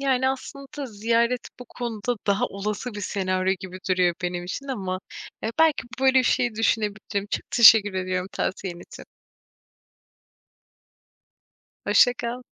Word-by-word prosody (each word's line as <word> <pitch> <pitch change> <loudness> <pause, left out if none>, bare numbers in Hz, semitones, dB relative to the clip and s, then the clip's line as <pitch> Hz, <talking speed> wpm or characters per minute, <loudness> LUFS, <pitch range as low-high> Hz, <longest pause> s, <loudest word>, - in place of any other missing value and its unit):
yani, 260 -1 +2
aslında 275 +1 -6
ziyaret 230 +2 0
bu 250 - -9
konuda, 240 -1 -4
daha 200 0 +2
olası 210 +4 -4
bir 205 - -5
senaryo 185 -1 0
gibi 185 -1 -8
duruyor 180 -2 +3
benim 175 0 -2
için 230 +10 -6
ama, 190 -7 -3 0.4
eee, 225 - -2
belki 320 -7 +4 0.2
böyle 265 0 +5
bir - - +4
şeyi 240 -2 +1
düşünebilirim, 210 -2 -1
çok - - -4
teşekkür 220 -4 +7
ediyorum 185 0 -2
tavsiyen 180 -2 -3
için. - - -12 2.8
Hoşça 245 - +5
kal. 245 +1 -5
215 Hz, 130 wpm, -24 LUFS, 190-250 Hz, 2.8 s, teşekkür